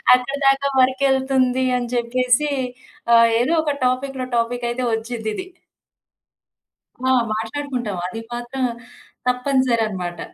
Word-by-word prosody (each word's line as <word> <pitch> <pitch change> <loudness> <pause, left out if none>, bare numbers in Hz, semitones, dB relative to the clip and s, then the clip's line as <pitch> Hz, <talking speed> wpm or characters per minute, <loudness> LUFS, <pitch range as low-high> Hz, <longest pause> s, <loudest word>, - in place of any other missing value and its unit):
అక్కడి 265 +3 -3
దాకా 275 +1 +3
వర్క్ 260 +1 +3
ఎళ్తుంది." 260 -1 +1
అని 245 -1 -3
జెప్పేసి 250 +4 +1 0.6
ఆహ్, 230 0 +7
ఏదో 265 +7 +1
ఒక 295 -2 0
టాపిక్‌లో 255 +1 -1
టాపికయితే 240 +1 -1
ఒచ్చిద్దిది. 225 - -4 1.6
ఆ! - - +4 0.2
మాట్లాడుకుంటాం. 235 -1 -3
అది 225 - -6
మాత్రం 240 +2 -4 0.6
తప్పనిసరన్నమాట. 235 -9 0
250 Hz, 100 wpm, -21 LUFS, 235-265 Hz, 1.6 s, ఆహ్